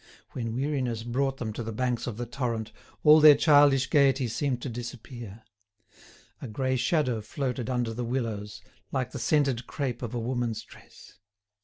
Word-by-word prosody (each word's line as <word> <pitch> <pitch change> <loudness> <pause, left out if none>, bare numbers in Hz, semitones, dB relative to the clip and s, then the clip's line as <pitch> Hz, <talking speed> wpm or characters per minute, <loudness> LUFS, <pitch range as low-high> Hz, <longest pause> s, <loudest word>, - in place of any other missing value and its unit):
When 115 -2 -4
weariness 130 -4 -1
brought 135 +3 -1
them 110 -4 -4
to 115 - -5
the 115 0 -4
banks 125 +2 -2
of 115 -3 -4
the 120 - -3
torrent, 115 -3 -3 0.3
all 155 0 +8
their 150 -1 +9
childish 145 -3 +5
gaiety 135 -2 +3
seemed 130 +2 -1
to - - -3
disappear. 120 -2 -8 1.0
A - - -5
grey 130 +4 -1
shadow 125 -4 +1
floated 125 +2 -3
under 120 -3 -1
the 120 +2 -4
willows, 115 -4 -3 0.3
like 130 -2 -2
the - - -6
scented 135 -5 +1
crape 130 -5 -3
of 120 -1 -5
a - - -1
woman's 115 -2 -2
dress. - - -17
125 Hz, 165 wpm, -27 LUFS, 115-135 Hz, 1.0 s, their